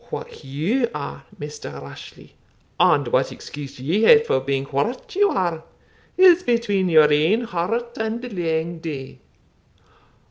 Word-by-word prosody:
What - - -8
you 180 - -1
are, 140 -1 -6
Maister 150 0 -7
Rashleigh, 70 0 -12 0.5
and - - +4
what - - +1
excuse 140 -2 -9
ye 165 +11 0
hae 225 0 +7
for 135 - +1
being 135 0 -2
what 235 - -3
you 405 +1 +4
are, 170 -4 -1 0.5
is 365 -1 +7
between 210 - 0
your 155 -2 +6
ain 165 +10 +3
heart 230 +3 -3
and 220 +1 -2
the 250 +1 -7
lang 165 -3 -2
day. 145 -5 -7
170 Hz, 140 wpm, -22 LUFS, 150-235 Hz, 0.5 s, hae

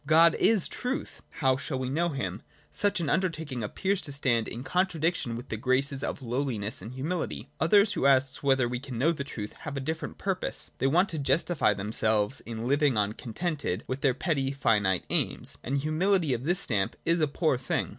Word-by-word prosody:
God 165 +2 +6
is 220 -6 +4
truth: 250 +2 -4
how 130 -3 +1
shall 135 0 -3
we 130 0 -2
know 165 +6 +1
Him? 105 - -3 0.3
Such 205 -1 +1
an 165 - -1
undertaking 160 -7 -1
appears 190 - -1
to 145 - -5
stand 125 -5 +1
in 120 +2 -6
contra 180 +2 0
diction 155 -7 0
with 120 +3 -9
the 110 - -2
graces 135 +4 +1
of 140 - -3
lowliness 120 -5 -2
and 110 +6 -8
humiUty.— 160 +7 -3
Others 200 +6 +5
who 140 - +2
ask 135 0 +3
whether 135 -3 +3
we 120 0 -3
can 130 -2 -7
know 145 +8 +3
the 150 -4 -3
truth 110 -7 -6
have 145 -3 -5
a - - 0
different 160 +4 -4
purpose. 195 -2 -3
They 135 - +2
want 175 +8 +4
to 160 - -3
justify 140 - +2
themselves 105 +3 0
in 115 0 -4
living 140 -2 +3
on 105 0 +1
contented 135 - -3
with 130 +1 -4
their 130 -3 +3
petty, 140 -3 0
finite 105 -8 +2
aims. - - 0
And 135 +3 -1
humility 155 +2 +2
of 120 +2 -3
this 175 +3 +2
stamp 105 - -1
is 170 +1 +2
a 155 - +3
poor 145 -2 +1
thing. 130 - -1
140 Hz, 200 wpm, -28 LUFS, 120-165 Hz, 0.3 s, God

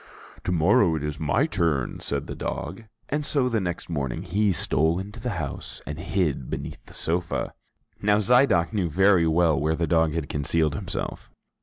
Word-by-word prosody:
"To - - 0
morrow 85 +1 +4
it 75 - -3
is 75 0 -3
my 100 - +2
turn," 85 - 0
said 70 -1 -2
the - - -6
dog. 95 +9 -5 0.2
And 150 +2 -1
so 140 -3 +3
the 115 -3 0
next 85 -2 -4
morning 75 0 -3
he 100 +3 +1
stole 80 -1 +1
into 100 +4 -6
the 125 - -3
house 70 -4 -4
and 75 +1 -5
hid 90 -4 0
again 65 - -9
beneath - - -5
the - - -13
sofa. 85 +1 -1 0.5
Now 105 0 +4
Zidoc 110 -5 +3
knew 95 -5 0
very 95 0 +4
well 80 -2 +3
where 80 +2 +1
the 85 - 0
dog 80 -1 +2
had 80 -4 -2
concealed 75 +1 0
himself. - - -5
85 Hz, 185 wpm, -25 LUFS, 80-100 Hz, 0.5 s, morrow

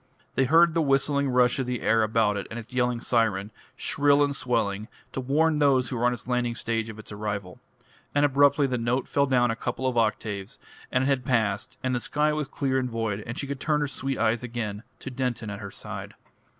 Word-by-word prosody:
They 135 - +2
heard 165 +4 +5
the 165 - +2
whistling 140 0 +2
rush 125 0 +3
of 130 - -1
the 125 -2 -3
air 115 +1 +3
about 110 -1 +2
it 100 - -4
and 110 - -6
its 115 +1 -9
yelling 125 -1 +1
siren, 110 -4 +1 0.2
shrill 145 0 +3
and 140 -1 0
swelling, 110 -5 -1 0.2
to 130 - -3
warn 150 +4 +2
those 135 -4 +3
who - - -3
were 120 0 0
on - - +2
its 120 - -8
landing 125 -1 0
stage 115 0 -2
of 110 - -8
its 110 - -11
arrival. 100 -3 -4 0.6
And 145 0 +4
abruptly 145 +1 +4
the 125 -2 -1
note 120 +3 0
fell 140 0 +2
down 125 -2 +3
a - - -2
couple 125 +3 -4
of 125 -2 +2
octaves, 105 -1 -2 0.3
and 130 - +2
it - - +1
had 135 -2 +1
passed, 110 -5 0
and 130 0 0
the 125 - +1
sky 150 +5 +1
was 150 -2 -2
clear 135 -1 0
and 125 -1 -2
void, 115 -3 -2
and 120 +3 -5
she - - -3
could 140 -1 -5
turn 150 +1 +1
her 145 - +1
sweet 135 -1 -2
eyes 115 +1 +1
again 115 -4 -4 0.2
to 135 - -6
Denton 125 -4 -2
at 100 - -6
her 100 -2 -6
side. - - -7
125 Hz, 230 wpm, -26 LUFS, 110-135 Hz, 0.6 s, heard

